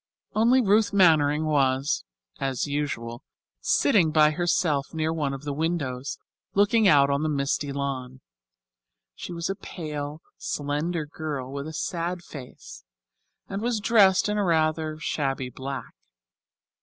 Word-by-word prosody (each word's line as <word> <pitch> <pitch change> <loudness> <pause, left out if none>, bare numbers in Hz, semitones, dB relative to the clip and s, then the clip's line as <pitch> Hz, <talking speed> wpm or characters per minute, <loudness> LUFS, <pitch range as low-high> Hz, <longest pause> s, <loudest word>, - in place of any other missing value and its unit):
Only 240 +4 +4
Ruth 210 +1 +3
Mannering 155 -5 +4
was, 135 -2 +1 0.3
as 135 -3 -1
usual, 140 -5 -3 0.4
sitting 200 - +3
by 155 -1 +5
herself 155 -3 0
near 160 0 0
one 150 -4 -1
of 135 +1 -6
the 145 -1 -3
windows, 145 -4 -2 0.4
looking 205 +2 +4
out 140 -4 +5
on 140 +1 +1
the 155 - 0
misty 140 0 -1
lawn. 135 -2 -4 0.9
She 180 - -8
was 170 -1 -3
a 195 - -1
pale, 150 -5 -6 0.2
slender 150 +3 -2
girl, 145 -4 -5
with 140 +1 -5
a - - -5
sad 170 +2 -3
face, 125 - -11 0.6
and 195 +1 -4
was 235 -1 0
dressed 205 -4 +4
in 210 0 0
rather 155 -4 +1
shabby 135 -4 -2
black. 130 -1 -6
150 Hz, 130 wpm, -26 LUFS, 140-175 Hz, 0.9 s, by